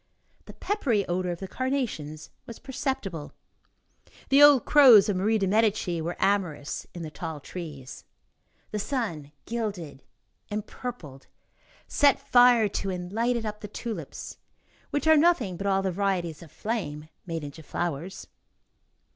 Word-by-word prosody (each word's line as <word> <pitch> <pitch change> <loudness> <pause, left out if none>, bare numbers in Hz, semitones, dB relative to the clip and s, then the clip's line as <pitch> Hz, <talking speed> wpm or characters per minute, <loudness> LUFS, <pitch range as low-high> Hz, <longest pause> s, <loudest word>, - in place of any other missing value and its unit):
The - - -11
peppery 250 - 0
odor 180 +1 -1
of 175 0 -4
the 190 - -4
carnations 220 - -3 0.2
was 230 - -8
perceptible. 265 - -4 1.0
The 275 +1 +6
old 290 -4 +8
crows 255 -9 +8
of 200 - +1
Marie 210 +4 +2
de 195 - 0
Medici 200 -4 +1
were 170 +2 -3
amorous 175 -8 -1
in 170 - -6
the 155 - -6
tall 160 -1 -6
trees. 145 -5 -8 0.7
The 210 - -2
sun 200 - -3
gilded, 200 -12 -4 0.5
empurpled, 205 - -7 0.6
set 285 -2 +4
fire 245 -3 +5
to 195 0 -3
and 180 0 -5
lighted 235 +1 0
up 210 0 -5
the 210 - -6
tulips, 210 - -7 0.5
which 290 - -2
are 315 0 +6
nothing 290 - +3
but 195 +3 -4
all 195 0 +2
the 190 - 0
varieties 180 -4 -1
of 165 -4 -13
flame 155 -10 -4 0.2
made 165 -2 -4
into 145 +2 -8
flowers. 170 +3 -4
195 Hz, 140 wpm, -27 LUFS, 165-235 Hz, 1.0 s, old